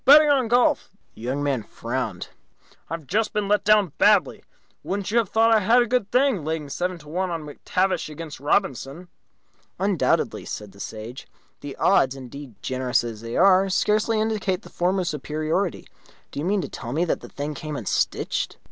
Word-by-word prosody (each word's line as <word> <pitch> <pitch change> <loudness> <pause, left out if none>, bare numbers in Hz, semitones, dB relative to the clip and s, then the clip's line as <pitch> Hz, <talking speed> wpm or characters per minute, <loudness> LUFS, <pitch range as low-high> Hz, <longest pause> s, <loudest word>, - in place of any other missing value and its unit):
Betting 295 +2 +8
on 265 -4 +2
golf." 245 +2 +3 0.2
The - - -15
Young 130 +4 -2
Man 140 -4 0
frowned. 115 -4 -4 0.6
"I've 165 -1 -5
just 215 +7 0
been 210 -2 0
let 210 +1 +2
down 205 -6 +4
badly. 210 +1 +4 0.4
Wouldn't 200 +1 -3
you 235 - +4
have 220 -5 -1
thought 225 +1 +4
I 220 - +5
had 230 +5 +4
a - - -2
good 240 -3 0
thing, 250 - +2
laying 155 -1 -3
seven 180 +4 -2
to 150 -3 -16
one 180 +4 -2
on 165 -2 -3
McTavish 180 +5 -1
against 155 0 -8
Robinson?" 145 - -1 0.7
"Undoubtedly," 195 -3 +1
said 105 -2 -7
the 100 - -18
Sage. 110 +5 -7 0.3
"The 145 -1 -7
odds, 135 -9 +3
indeed, 135 -1 -10
generous 130 -1 0
as 115 -2 -6
they 115 +1 -4
are, 195 +1 +5
scarcely 215 +3 +2
indicate 215 -3 -1
the - - -12
former's 180 0 0
superiority. 155 +5 -2 0.4
Do - - -5
you 150 - -2
mean 200 +1 +1
to - - -4
tell 120 0 -7
me 165 +4 +1
that 165 - -1
the - - -11
thing 145 +2 -4
came 150 +1 -6
unstitched?" 115 -8 -1
175 Hz, 185 wpm, -24 LUFS, 140-210 Hz, 0.7 s, Betting